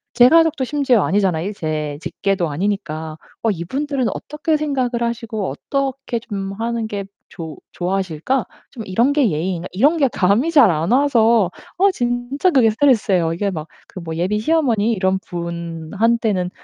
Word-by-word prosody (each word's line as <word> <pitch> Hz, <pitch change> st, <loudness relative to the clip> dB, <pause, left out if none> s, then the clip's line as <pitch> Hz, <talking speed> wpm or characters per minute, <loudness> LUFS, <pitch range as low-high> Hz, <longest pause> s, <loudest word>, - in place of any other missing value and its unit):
제 245 Hz, 0 st, +8 dB
가족도 325 Hz, -4 st, +4 dB
심지어 265 Hz, -5 st, +2 dB
아니잖아 185 Hz, -4 st, +1 dB
이 205 Hz, +4 st, -3 dB
제 155 Hz, -4 st, -3 dB
직계도 190 Hz, -5 st, -1 dB
아니니까. 160 Hz, -2 st, -3 dB, 0.3 s
'어 225 Hz, -, +3 dB
이분들은 260 Hz, -, -2 dB
어떻게 305 Hz, +1 st, -2 dB
생각을 260 Hz, -5 st, -1 dB
하시고 230 Hz, -, -3 dB
어떻게 270 Hz, -, -3 dB
좀 195 Hz, -4 st, -5 dB
하는 230 Hz, -1 st, -2 dB
게 200 Hz, -2 st, -4 dB, 0.2 s
좋 160 Hz, -4 st, -8 dB, 0.2 s
좋아하실까? 190 Hz, -, -1 dB, 0.3 s
좀 235 Hz, -5 st, -7 dB
이런 230 Hz, +9 st, +2 dB
게 280 Hz, -7 st, +3 dB
예의인가?' 175 Hz, +3 st, -2 dB
이런 290 Hz, -, +3 dB
게 280 Hz, -4 st, +3 dB
감이 210 Hz, -, +2 dB
잘 260 Hz, -, +6 dB
안 165 Hz, +6 st, -1 dB
와서 230 Hz, -8 st, +3 dB, 0.3 s
어 395 Hz, +1 st, +4 dB
진짜 245 Hz, +5 st, 0 dB
그게 250 Hz, -6 st, +5 dB
스트레스예요. 210 Hz, -, +2 dB
이게 200 Hz, +3 st, -1 dB
막 155 Hz, -2 st, -6 dB, 0.2 s
그 185 Hz, -, -9 dB
뭐 160 Hz, -1 st, -5 dB
'예비 185 Hz, +5 st, 0 dB
시어머니 235 Hz, -5 st, +2 dB
이런 190 Hz, -1 st, +1 dB
분한테는 180 Hz, +4 st, -1 dB
215 Hz, 330 characters per minute, -19 LUFS, 180-260 Hz, 0.3 s, 제